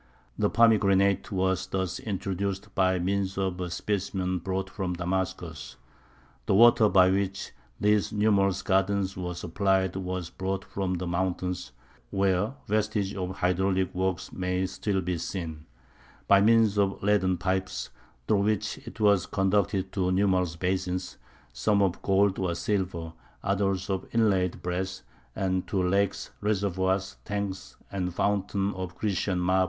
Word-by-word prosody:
The 105 -1 +1
pomegranate 100 -3 +3
was 95 -1 0
thus 95 -2 -2
introduced 95 -1 -3
by 95 -1 +2
means 95 +2 -1
of 95 -2 -1
a 90 - -3
specimen 95 -1 -2
brought 95 +2 -2
from 95 -2 -3
Damascus. 90 +2 -3 0.7
The - - +3
water 115 0 +7
by 95 -1 +5
which 100 0 -1 0.3
these 105 -3 +2
numerous 100 -3 +2
gardens 95 0 +1
were 90 -1 -4
supplied 95 +2 0
was 90 -2 -4
brought 95 +1 -3
from 95 -2 -2
the 90 +1 -3
mountains 90 -4 -2 0.4
(where 95 +4 +1
vestiges 105 -2 0
of 90 -2 -3
hydraulic 95 +1 +1
works 95 -2 -2
may 90 0 -1
still 95 +1 -1
be 90 -1 -2
seen) 80 -3 -5 0.6
by 100 0 +6
means 110 -1 +4
of 100 -1 0
leaden 95 -3 +2
pipes, 95 +1 -2 0.4
through 100 -2 +3
which 105 0 0
it - - -9
was 100 -3 +4
conducted 95 -1 +1
to 90 -2 0
numerous 95 -3 +2
basins, 90 +1 -2 0.3
some 80 - +2
of 95 -3 0
gold 100 0 +2
or 90 -3 0
silver, 90 -6 -2 0.3
others 95 -1 0
of 95 -2 -2
inlaid 95 -6 +2
brass, 90 +2 -3 0.3
and 95 -1 -1
to 95 -2 0
lakes, 100 +1 0
reservoirs, 95 -2 0
tanks, 100 -2 -4 0.2
and 90 -3 -3
fountains 100 0 0
of 95 -2 -5
Grecian 95 -2 -1
marble. 90 +1 +2
95 Hz, 135 wpm, -27 LUFS, 90-100 Hz, 0.7 s, water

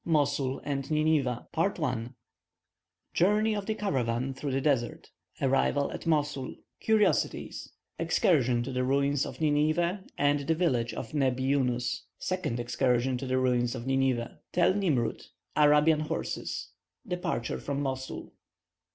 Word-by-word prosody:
MOSUL 140 -4 +1
AND 140 -2 -3
NINEVEH. 150 -6 +1 1.6
JOURNEY 210 +4 +3
OF 205 -2 -3
THE 220 - 0
CARAVAN 130 - -1
THROUGH 140 +2 -4
THE 135 +1 0
DESERT 130 -5 -1 0.3
ARRIVAL 135 +1 +2
AT - - -7
MOSUL 145 -4 0 0.2
CURIOSITIES 220 -2 +1 0.3
EXCURSION 125 -8 +2
TO 135 - -5
THE 125 0 0
RUINS 140 +1 +1
OF - - -9
NINEVEH 155 +5 +2 0.2
AND 145 0 +3
THE 160 - +3
VILLAGE 125 -9 0
OF 115 - -6
NEBBI 130 -3 +1
YUNUS 125 -3 0 0.2
SECOND 185 -10 -2
EXCURSION 125 +1 +1
TO 135 - -5
THE 130 0 +1
RUINS 125 -1 +1
OF 120 -1 -6
NINEVEH 135 -3 0
TEL 175 +1 +3
NIMROUD 160 - 0 0.3
ARABIAN 150 +1 +5
HORSES - - -3 0.4
DEPARTURE 175 -9 -2
FROM 140 0 -3
MOSUL. 130 -1 -4
140 Hz, 125 wpm, -29 LUFS, 130-155 Hz, 1.6 s, ARABIAN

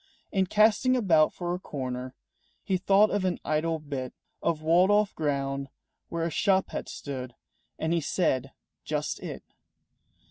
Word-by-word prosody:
In 190 -2 +1
casting 220 +6 +4
about 165 -10 +4
for 175 -1 -3
a 180 - -3
corner 130 -5 -5 0.5
He 190 - 0
thought 195 +3 +4
of 205 - 0
an 185 -2 0
idle 160 +2 0
bit 140 -4 -5 0.3
Of 160 -2 -1
walled 175 +4 +4
off 205 0 +3
ground 140 -2 -2 0.4
where 165 -1 -2
a 165 - -2
shop 190 +2 +2
had - - -5
stood, 130 -3 -6 0.4
And 160 +1 -1
he 170 - +1
said, 135 -4 0 0.3
"Just - - -2
it." - - -7
165 Hz, 150 wpm, -28 LUFS, 140-190 Hz, 0.5 s, casting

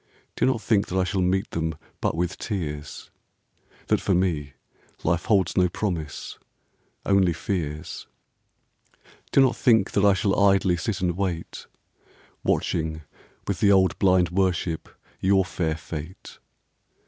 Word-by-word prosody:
Do - - +2
not 130 -4 +1
think 105 -1 +2
that 95 - -3
I 95 - +3
shall 95 +1 -1
meet 95 +2 0
them 80 -1 -2 0.3
But - - 0
with 90 +2 -2
tears, 75 -8 -5 0.4
— - - -32
That - - +2
for 95 - +1
me 80 -6 0 0.5
life 85 +1 0
holds 95 -5 +2
no 90 -1 +3
promise, 85 -6 -4 0.7
Only 95 -3 +3
fears. 80 -4 -4 1.2
Do 135 - +5
not 130 -2 +4
think 110 -4 +3
that 100 - +1
I 100 -1 +6
shall 100 +1 +1
idly 95 -2 +4
Sit 90 +3 -3
and 90 -2 0
wait, 90 -3 -4 0.8
Watching, 80 -1 -1 0.4
with - - -2
the 100 - +4
old 95 -1 +3
blind 90 -3 +3
worship. 90 -3 -1 0.3
Your 95 0 +3
fair 80 -4 -2
fate. 80 +2 -8
90 Hz, 140 wpm, -25 LUFS, 85-100 Hz, 1.2 s, I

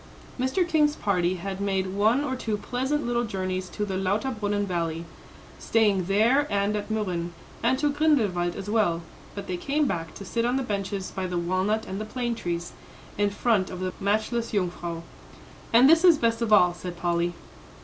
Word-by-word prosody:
Mr. 260 +8 +1
King's 300 -3 +3
party 180 - +1
had 190 +2 -5
made 195 -1 0
one 220 +7 +3
or 260 -3 -2
two 220 -4 -2
pleasant 265 +7 -2
little 240 0 0
journeys 185 -3 -3
to 210 - -3
the 190 -2 -3
Lauterbrunnen 205 +1 0
Valley, 170 -3 -2 0.5
staying 205 -5 +2
there 230 +10 +3
and 200 +1 +1
at 210 - -4
Mürren, 185 -6 -1 0.3
and 255 +3 +2
to 295 +1 +1
Grindelwald 215 - +2
as 195 0 -6
well; 205 -6 +1 0.3
but 200 - -5
they 180 - -3
came 290 +9 0
back 165 - -3
to 200 - -8
sit 230 +5 -1
on 245 +2 +1
the 270 - 0
benches 200 -3 -3
by 190 -1 -3
the 180 -1 -2
walnut 185 +5 0
and 195 +2 -5
the - - -3
plane 240 +2 -2
trees, 175 -5 -4 0.4
in 205 0 +2
front 200 -2 +1
of 185 - -6
the 185 0 -3
matchless 220 +4 0
Jungfrau. 175 -3 -2 0.7
"And 240 +3 +7
this 325 +3 +6
is 345 -4 +7
best 230 -2 +1
of 230 -2 0
all," 180 -4 +6
said 175 0 -7
Polly. 170 0 0
205 Hz, 185 wpm, -26 LUFS, 185-235 Hz, 0.7 s, And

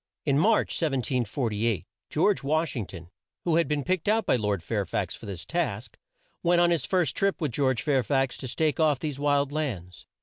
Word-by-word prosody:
In 140 -1 +3
March, 215 +6 +3
1748, 120 - 0 0.2
George 185 +6 +2
Wash 155 +3 0
ing 110 -6 -3
ton, 85 -1 -11 0.3
who 165 -2 +2
had 170 - +2
been 150 -1 -1
picked 185 +1 -1
out 220 0 +3
by - - +3
Lord 105 -6 -1
Fair - - -1
fax - - -2
for - - -11
this 95 -4 -6
task, 130 -11 -2 0.5
went 175 0 +3
on 175 0 +4
his 165 -7 +1
first 180 -4 +1
trip 195 -1 +1
with 155 -6 -1
George 130 0 +1
Fair 140 -4 +2
fax 135 +1 0
to 130 - -5
stake 155 +3 0
off 155 -3 +3
these 145 -1 -4
wild 145 -1 +2
lands. 105 - -4
145 Hz, 200 wpm, -27 LUFS, 120-165 Hz, 0.5 s, on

